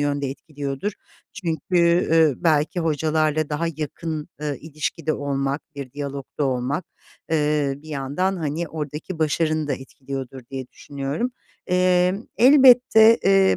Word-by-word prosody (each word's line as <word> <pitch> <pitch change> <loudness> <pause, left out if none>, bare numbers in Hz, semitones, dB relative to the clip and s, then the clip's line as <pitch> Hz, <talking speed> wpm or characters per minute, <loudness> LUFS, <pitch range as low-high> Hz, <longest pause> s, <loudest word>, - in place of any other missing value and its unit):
yönde 145 -1 0
etkiliyordur 145 +5 -5 0.4
çünkü, 170 -2 +1
ııı, 160 -4 +5
belki 160 +2 +2
hocalarla 155 -1 +1
daha 155 +3 -1
yakın, 155 0 -4
ııı, 145 -3 -2
ilişkide 155 +1 -3
olmak, 140 0 -2
bir 135 -3 -7
diyalogda 140 0 -4
olmak, 135 +5 -1 0.5
eee, 150 -3 +1
bir 150 +3 -15
yandan, 150 +7 -1
hani, 160 +1 -3
oradaki 155 +3 -6
başarını 155 0 0
da - - +1
etkiliyordur 135 0 -7
diye 130 -2 -5
düşünüyorum. 140 - -4 0.4
Emm, 180 +2 +2
elbette, 250 -3 +7
eee, 195 0 +5
155 Hz, 120 wpm, -23 LUFS, 140-170 Hz, 0.5 s, elbette